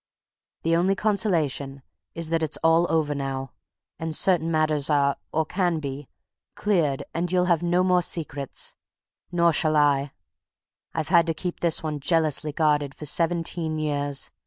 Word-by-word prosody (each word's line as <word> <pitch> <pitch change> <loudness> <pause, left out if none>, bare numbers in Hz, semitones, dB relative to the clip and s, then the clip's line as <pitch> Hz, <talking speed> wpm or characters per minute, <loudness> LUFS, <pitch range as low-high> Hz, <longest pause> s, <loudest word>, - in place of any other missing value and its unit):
"The 165 0 +2
only 185 +3 +2
consolation 160 -10 0 0.3
is 165 -1 -4
that 165 -1 +1
it's 160 -1 -2
all 165 +1 +4
over 155 -2 +1
now, 135 -1 -4 0.5
and 160 -1 -3
certain 170 -3 +2
matters 155 -2 +1
are, 140 -2 +3 0.2
or 160 0 0
can 175 0 0
be, 140 -1 -6 0.5
cleared 165 -10 0
and 175 +1 -2
you'll 180 -1 +2
have 170 -3 +2
no 175 +1 +2
more 180 -1 +3
secrets. 145 -6 -2 0.6
Nor 170 -1 +3
shall 155 +1 +2
I! 145 -2 +3 0.8
I've 160 -1 -2
had 170 -2 +5
to 165 - 0
keep 180 +2 -5
this 170 -2 +1
one 155 -2 -3
jealously 155 0 +1
guarded 145 -2 +1
for 150 - -8
seventeen 165 0 0
years! 145 -2 -1
160 Hz, 155 wpm, -25 LUFS, 145-170 Hz, 0.8 s, had